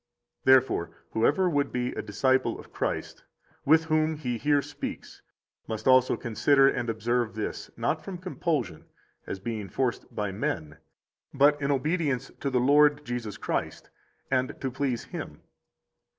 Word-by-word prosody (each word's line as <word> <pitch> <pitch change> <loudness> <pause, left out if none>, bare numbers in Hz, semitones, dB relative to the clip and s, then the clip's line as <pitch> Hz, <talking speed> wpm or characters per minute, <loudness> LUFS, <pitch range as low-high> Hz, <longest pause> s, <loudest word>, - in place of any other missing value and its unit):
Therefore, 130 -10 +4 0.2
whoever 145 +11 +2
would 145 -4 +1
be 125 0 -1
a - - -4
disciple 130 +6 +1
of - - -14
Christ, - - -3 0.4
with 160 +3 +5
whom 155 0 +1
He 125 -6 -3
here 145 +1 +2
speaks, - - -7 0.5
must 110 -1 -5
also 130 -1 +5
consider 135 +4 +3
and 125 -3 0
observe 115 +1 -1
this, 110 - -4
not 135 +7 -1
from 185 +2 -6
compulsion, 165 - -2 0.4
as 95 - -4
being 105 -1 -4
forced 125 +5 -2
by 105 -2 -1
men, 80 -6 -3 0.6
but 145 +2 +4
in 140 - 0
obedience 145 -1 0
to 140 - -1
the 130 -2 +1
Lord 145 +3 +4
Jesus 120 -4 -4
Christ, - - -3 0.4
and 130 -1 0
to 130 - -3
please 130 -2 -1
Him. - - -8
130 Hz, 145 wpm, -27 LUFS, 115-145 Hz, 0.6 s, with